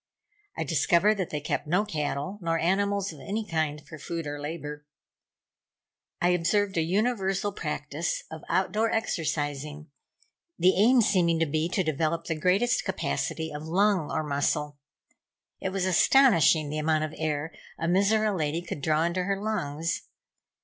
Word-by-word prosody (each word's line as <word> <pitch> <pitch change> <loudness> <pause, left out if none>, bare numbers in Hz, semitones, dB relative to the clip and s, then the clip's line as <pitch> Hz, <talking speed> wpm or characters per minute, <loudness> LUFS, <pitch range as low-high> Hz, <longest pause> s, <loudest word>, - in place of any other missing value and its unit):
I - - 0
discovered 205 +4 +3
that 185 - -1
they 150 - -3
kept 145 - -3
no 180 +7 +2
cattle, 150 +3 -3
nor 165 -1 0
animals 200 +2 0
of 150 - -13
any 215 +7 -3
kind 155 -4 -1
for 155 - -10
food 165 +2 -4
or 145 0 -5
labor. 150 -1 -6 1.4
I 175 - +2
observed 190 +3 +1
a 165 - +2
universal 195 +2 0
practice 150 -2 -3
of 160 -1 -7
outdoor 215 +4 +1
exercising; 150 -7 -2 0.7
the 185 +2 +4
aim 235 +5 +5
seeming 175 -5 +3
to 165 - +3
be 155 +2 -1
to 190 0 0
develop 160 +1 -1
the 165 - -1
greatest 185 +10 +2
capacity 160 -1 -2
of 150 +2 -6
lung 190 -1 +2
or 155 - -1
muscle. 145 0 -1 0.8
It 190 - -2
was 190 -1 -1
astonishing 175 - +4
the 155 - -2
amount 155 0 +1
of 155 0 -4
air 155 0 -2 0.2
a 165 - -3
Mizora 205 +3 +2
lady 160 0 -1
could 150 - -6
draw 155 +2 +2
into 175 +2 0
her 195 0 -1
lungs. 165 -7 -2
165 Hz, 155 wpm, -27 LUFS, 155-195 Hz, 1.4 s, aim